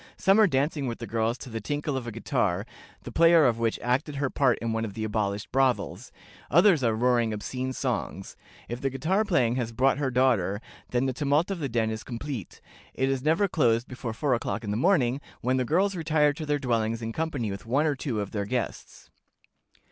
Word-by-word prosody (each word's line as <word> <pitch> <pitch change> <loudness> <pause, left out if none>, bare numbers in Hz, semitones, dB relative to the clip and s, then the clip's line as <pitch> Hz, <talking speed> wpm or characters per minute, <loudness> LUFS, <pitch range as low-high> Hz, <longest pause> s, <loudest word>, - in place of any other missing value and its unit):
Some 195 +3 +4
are 215 - +7
dancing 140 -1 0
with 115 - -3
the 115 - -6
girls 115 +2 -1
to 130 - -9
the 115 0 -4
tinkle 145 +4 -2
of 130 -3 -4
a - - -4
guitar, 110 - -1 0.4
the 125 - -7
player 165 +2 +6
of 115 -2 +2
which 115 -1 0
acted 135 +4 0
her 140 -1 -1
part 130 -4 +2
in 115 -1 -3
one 115 0 -1
of 105 -3 -5
the 110 - -3
abolished 105 -1 -2
brothels; 130 -2 0 0.4
others 170 -1 +5
are 115 -2 +2
roaring 120 -1 +2
obscene 130 +5 -4
songs. 120 -7 -3 0.3
If 120 +1 -5
the 135 - 0
guitar 160 +11 0
player 170 - +2
has 120 -2 -2
brought 135 +4 +2
her 140 -2 0
daughter, 120 -7 +2 0.3
then 125 +1 +1
the 130 - 0
tumult 145 +6 +1
of 190 - -3
the 140 -4 -2
den 110 -1 0
is 110 0 -5
complete. 120 - -6 0.3
It 135 0 +1
is 135 -1 0
never 160 +8 +2
closed 120 -8 +2
before 125 -3 -5
four 140 +3 0
o'clock 115 -1 -2
in 105 - -3
the - - -1
morning, 135 - +2 0.2
when 130 +1 +1
the 130 - 0
girls 190 +9 +2
retire 155 -3 +2
to 155 0 -7
their 150 0 +2
dwellings 115 -4 -1
in 115 - -3
company 145 -9 -2
with 100 +3 -8
one 140 +6 +2
or 150 -2 +1
the 140 - -5
other 105 - -1
of 100 - -9
their 100 -2 -2
guests." 125 +2 -5
125 Hz, 220 wpm, -27 LUFS, 115-145 Hz, 0.4 s, are